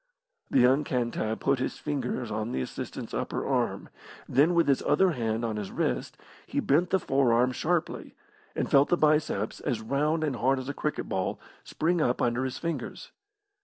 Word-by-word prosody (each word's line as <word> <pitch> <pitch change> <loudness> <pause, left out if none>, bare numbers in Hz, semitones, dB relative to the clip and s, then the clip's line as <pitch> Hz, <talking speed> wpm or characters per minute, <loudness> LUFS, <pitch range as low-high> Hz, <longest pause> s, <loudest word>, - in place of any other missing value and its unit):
The - - +1
young 130 +4 +5
Cantab 120 -4 -2
put 135 -1 +2
his 130 - -2
fingers 125 -5 -3
on 110 +2 -2
the 65 - -1
assistant's - - -6
upper - - -2
arm, - - -1 0.4
then 155 +6 +3
with 170 - +3
his 140 -2 +3
other 190 -1 +3
hand 115 -4 -1
on 110 -2 -2
his 105 -2 -4
wrist, - - -2 0.3
he - - -1
bent 165 +6 +2
the 190 - +3
forearm 130 -6 +2
sharply, 165 +5 -2 0.4
and - - -1
felt 140 +1 +4
the 175 - +3
biceps, 150 -10 +1
as 120 -4 -2
round 150 +7 0
and 145 -5 -1
hard 135 +3 +2
as 130 0 -5
a 140 - -3
cricket 150 +1 -3
ball, 95 -1 -2 0.2
spring 170 +1 0
up 125 -4 +1
under 120 +2 +1
his 130 - -4
fingers. 170 -1 -5
130 Hz, 180 wpm, -28 LUFS, 120-150 Hz, 0.4 s, young